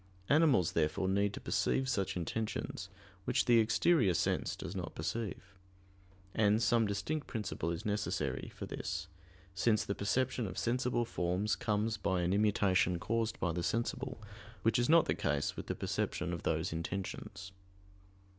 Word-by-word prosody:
Animals, 140 - +4
therefore, 75 +5 +1
need 100 +1 +2
to - - -6
perceive 130 - 0
such 100 -8 0
intentions, 95 0 -3 0.4
which - - +2
the 120 -1 +6
exterior 115 - +3
sense - - 0
does 95 - -6
not 90 -4 -5
perceive. 95 +2 -4 0.8
And 105 0 +3
some 115 -1 +3
distinct 100 +10 -2
principle 105 -7 -3
is 85 +6 -4
necessary 100 -11 -2
for - - -5
this; - - -4 0.5
since 105 +3 +2
the 100 - -1
perception 120 +3 0
of 95 - -7
sensible 120 0 +1
forms 90 +1 0
comes 105 0 0
by 95 -1 0
an 90 +2 +1
immutation 95 -4 +3
caused 115 +5 -1
by 85 - 0
the 85 +1 -2
sensible, 125 - -2 0.4
which 115 +2 +3
is 120 - +1
not 165 0 +7
the - - +1
case 70 -1 -1
with - - -7
the - - -2
perception 90 0 -2
of 85 - -4
those 80 +2 0
intentions. 95 +2 -5
100 Hz, 155 wpm, -34 LUFS, 90-115 Hz, 0.8 s, not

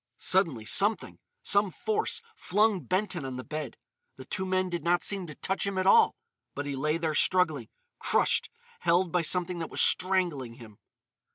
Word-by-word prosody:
Suddenly 165 - 0
something—some 205 - +1
force—flung 320 - -1
Benton 185 - -1
on 130 -1 -6
the 130 - -6
bed. 150 -5 -6 0.4
The 130 - -11
two 190 0 -4
men 185 0 0
did 175 -3 -4
not 175 +1 +1
seem 195 -3 -3
to 150 - -9
touch 190 +1 -2
him 195 -1 -3
at 185 - 0
all, 450 - +5 0.4
but 145 - -4
he 140 -1 -4
lay 150 +4 -1
there 160 -2 -2
struggling, 155 - +2 0.3
crushed, - - +2 0.3
held 175 +1 +1
by 180 - +1
something 180 +1 0
that 165 - -5
was - - -3
strangling 175 -10 +2
him. 110 -4 -14
180 Hz, 165 wpm, -28 LUFS, 150-190 Hz, 0.4 s, all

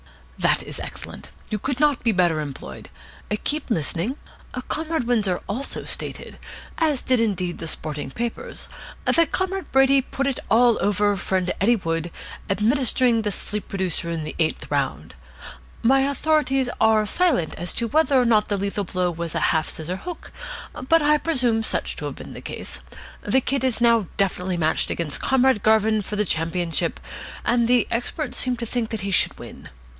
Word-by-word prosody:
"That - - +2
is - - -6
excellent. - - -7 0.2
You 210 - -1
could 265 +4 -2
not 295 -3 +2
be 230 - +4
better 175 -5 +2
employed. 135 - -7 0.5
Keep 300 -1 -1
listening. 180 - 0 0.5
Comrade 320 -2 -1
Windsor 210 -7 +1
also 245 +7 -2
stated - - -4 0.4
as 305 -5 +1
indeed 230 -6 +3
did 180 -1 -3
the 165 - -5
sporting 150 -3 -3
papers 235 - -5 0.4
that 335 -3 +3
Comrade 380 0 -2
Brady 270 0 +5
put 270 +1 -3
it 275 -2 -1
all 235 +1 +5
over 205 0 +2
friend 185 -1 -1
Eddie 235 +5 +5
Wood, 165 -4 -2 0.4
administering 235 +3 +3
the 210 -1 -1
sleep 210 +1 -2
producer 185 -3 -1
in 165 -2 -3
the 155 - -6
eighth 160 -1 -1
round. - - -1 0.7
My 265 +4 +5
authorities 280 -3 +1
are 220 -1 +4
silent 295 - +1
as 175 +2 -3
to 235 - 0
whether 290 0 +3
or 250 - +3
not 215 -3 +3
the 205 - 0
lethal 200 +1 -2
blow 180 0 0
was 170 -1 -5
a - - +1
half 160 -1 0
scissor 170 +4 -4
hook, 350 - -8 0.6
but 330 -1 +5
I 300 0 +4
presume 245 -9 +1
such 220 - -1
to - - -5
have - - -4
been - - -9
the - - -9
case. - - -6 0.4
The 265 - +2
Kid 270 +1 -1
is 255 -3 +3
now 230 -4 +4
definitely 185 -2 0
matched 160 -1 +1
against 160 -4 -1
Comrade 265 -4 +3
Garvin 220 0 +3
for 210 - -5
the 210 0 +1
championship, 165 0 0 0.5
and 240 -1 +3
the 245 0 +3
experts 245 +4 -2
seem 250 -1 0
to 235 - -4
think 230 -1 -2
that 220 -3 -4
he 200 +1 -3
should 180 - +3
win. - - -11
220 Hz, 175 wpm, -23 LUFS, 180-265 Hz, 0.7 s, Brady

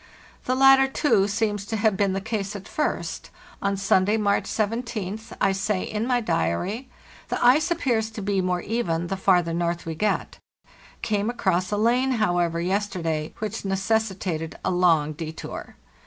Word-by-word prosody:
The 255 - +1
latter, 270 0 +6
too, 230 -7 +2
seems 205 -1 -1
to 225 - -2
have 215 -1 +2
been 195 -1 +1
the 195 - -1
case 210 -1 -3
at 195 -2 -8
first. 300 - -3 0.3
On 200 0 0
Sunday, 195 +2 +3
March 205 -2 +1
17th, 220 -1 -3
I 195 - +3
say 195 0 -1
in 215 +2 -3
my 250 -1 +2
diary: 200 - -1 0.4
'The - - 0
ice 300 +7 +5
appears 245 -10 0
to 220 -1 -7
be 195 -1 +1
more 180 -1 0
even 175 -7 -1
the 195 - -1
farther 180 -3 +2
north 170 0 -1
we 165 - -3
get; 210 +7 -1 0.6
came 210 0 0
across 185 -6 0
a 205 - 0
lane, 245 +5 +2
however, 175 -7 +1
yesterday 175 -4 -1
which 215 +1 -4
necessitated 190 -4 -1
a - - +1
long 165 -4 +3
detour. 160 +1 -7
200 Hz, 160 wpm, -24 LUFS, 180-225 Hz, 0.6 s, latter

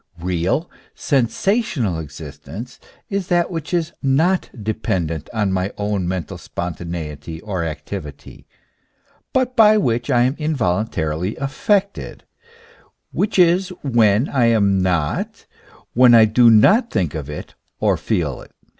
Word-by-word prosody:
Real, 90 - -1 0.3
sensational 135 - 0
existence 105 - -9 0.3
is 195 -2 -2
that 175 -1 +1
which 165 -2 -5
is 170 -2 -1
not 160 +7 +1
dependent 90 -7 -2
on 105 -4 0
my 95 +1 -1
own 100 -3 -1
mental 90 -3 -4
spontaneity 80 -3 -6
or 95 -5 -3
activity, 75 -1 -7 0.8
but 255 -1 0
by 215 -3 +6
which 120 - 0
I 120 -3 +4
am 130 +3 +1
involuntarily 100 - -1
affected, 195 +8 -1 0.9
which 205 - -1
is 180 +1 +4
when 115 -2 +3
I 130 -4 +1
am 100 -4 +3
not, 90 -5 -1 0.5
when 125 0 +7
I 110 -1 +8
do 115 +2 +5
not 195 - +5
think 85 -6 -1
of 75 -3 -5
it 75 - -7 0.3
or - - +2
feel - - -2
it. - - -16
110 Hz, 125 wpm, -20 LUFS, -, 0.9 s, I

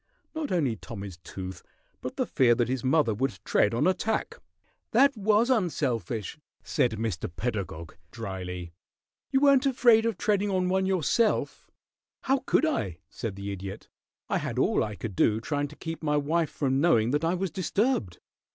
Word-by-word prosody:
Not 315 -2 -3
only 145 -10 +1
Tommy's 100 -6 -8
tooth, 95 +1 -7 0.4
but - - -5
the - - 0
fear 120 -2 +3
that 120 -1 +1
his 130 -1 -2
mother 135 -3 +3
would 125 -1 -1
tread 105 - +3
on 125 - +1
a 185 - +4
tack." 220 +3 -2 0.5
"That 275 +4 +5
was 215 +4 +3
unselfish," 135 - -1 0.2
said 125 -6 +1
Mr. 110 -6 -3
Pedagog, 90 -5 -4
dryly. 90 -5 -6 0.6
"You 270 -1 +2
weren't 280 -1 +5
afraid 240 -4 +5
of 225 -5 -2
treading 205 0 +1
on 185 -2 +1
one 190 0 +1
yourself." 190 +5 +1 0.5
"How 270 +1 +2
could - - +3
I?" 105 - -1
said 110 -4 -5
the 100 +1 -5
Idiot. 100 +1 -7 0.4
"I - - 0
had - - -4
all - - +2
I 105 -1 -4
could 105 -2 -6
do 110 +4 +3
trying 145 +4 -2
to 150 - -13
keep 165 +1 -6
my 150 -2 +1
wife 155 +3 +1
from 135 -1 0
knowing 125 -9 +3
that 150 +3 0
I 165 +2 +2
was 185 -1 -2
disturbed. 185 - 0
145 Hz, 170 wpm, -27 LUFS, -, 0.6 s, That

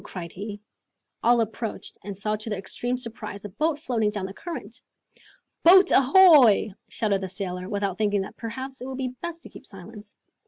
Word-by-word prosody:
cried 170 -3 -8
he. 205 +2 -7 0.6
All 240 0 +4
approached, 225 0 -5
and 200 -2 -7
saw 210 +2 -1
to 215 +1 -6
their 210 - -2
extreme 245 +6 -2
surprise, 220 -4 -6
a - - -5
boat 300 - -1
floating 240 -8 0
down 205 -2 -4
the 190 - -7
current. 255 - -7 0.8
"Boat 375 +3 +7
ahoy!" 275 - +6 0.2
shouted 200 -3 -1
the 190 - -4
sailor, 180 0 -4
without 200 -2 -2
thinking 205 -2 +1
that 190 - -7
perhaps 260 +3 -7
it 250 - -6
would 265 -1 -6
be 255 -2 -3
best 340 -1 -6
to - - -11
keep - - -13
silence. 205 +2 -12
215 Hz, 185 wpm, -25 LUFS, 200-255 Hz, 0.8 s, Boat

